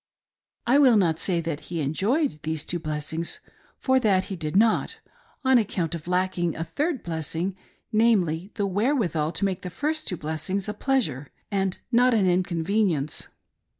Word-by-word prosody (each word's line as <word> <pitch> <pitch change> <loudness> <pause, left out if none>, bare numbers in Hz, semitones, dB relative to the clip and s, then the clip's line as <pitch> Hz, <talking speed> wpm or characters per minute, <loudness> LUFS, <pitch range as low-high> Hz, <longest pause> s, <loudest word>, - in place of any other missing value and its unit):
I 255 +4 +5
will 255 -6 +6
not 165 -5 +2
say 175 -3 0
that 160 -3 -3
he 170 -1 -2
enjoyed 195 - 0
these 160 -1 -3
two 175 - -2
blessings, 155 +1 -3 0.4
for 260 -1 +3
that 200 -6 +3
he - - -2
did 155 -1 -4
not, 220 +2 +3 0.5
on 260 -1 +6
account 180 -6 -1
of 170 -1 -6
lacking 180 -2 0
a 165 - -2
third 280 - -2
blessing, 165 +3 -3 0.4
namely, 200 -6 +2
the 205 - 0
where 210 +9 +1
withal 165 - 0
to 200 - -1
make 190 -1 -1
the 180 - -5
first 310 - -2
two 180 - -2
blessings 160 +6 -3
a 210 - -2
pleasure, 205 - -1 0.2
and 195 -2 0
not 245 0 +5
an 205 -4 +3
inconvenience. 175 -3 0
185 Hz, 165 wpm, -25 LUFS, 160-220 Hz, 0.5 s, will